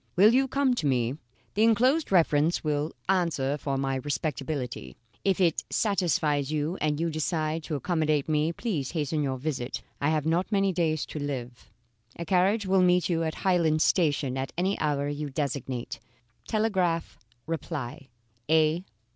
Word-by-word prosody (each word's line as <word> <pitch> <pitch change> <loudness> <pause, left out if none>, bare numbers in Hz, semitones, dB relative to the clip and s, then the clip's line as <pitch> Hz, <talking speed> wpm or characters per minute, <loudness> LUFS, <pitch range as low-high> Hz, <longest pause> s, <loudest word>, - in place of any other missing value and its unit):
Will 210 +5 +6
you 265 +1 +3
come 275 -1 +2
to 165 -12 -1
me? 125 +1 0 0.3
The 210 - 0
enclosed 250 +7 +3
reference 165 -2 +3
will 150 0 -1 0.2
answer 165 -7 +1
for 140 -1 -2
my 135 0 -1
respectability. 135 - -3 0.3
If 195 -1 +1
it 170 -4 +2
satisfies 155 -8 +1
you 155 +3 -1
and 150 -1 0
you 165 0 0
decide 155 0 -1
to 155 - -3
accommodate 155 -1 0
me, 155 +1 +1
please 170 - -3
hasten 155 -1 -1
your 135 -2 -1
visit; 130 -2 -4 0.2
I 145 - +2
have 155 -1 0
not 170 +6 0
many 195 -2 +2
days 160 -3 0
to 155 - -7
live. 130 -4 -5 0.5
A 170 - -5
carriage 195 +5 +2
will 190 0 +3
meet 180 0 +3
you 165 -2 +1
at 160 -1 -2
Highland 165 -4 +3
Station 145 -7 +1
at 130 - -3
any 190 +3 +1
hour 145 -2 0
you 145 0 -3
designate. 130 -3 -3 0.5
Telegraph 190 -7 0 0.3
reply. 145 -5 -5 0.4
A. 160 +2 +3
155 Hz, 155 wpm, -27 LUFS, 145-180 Hz, 0.5 s, Will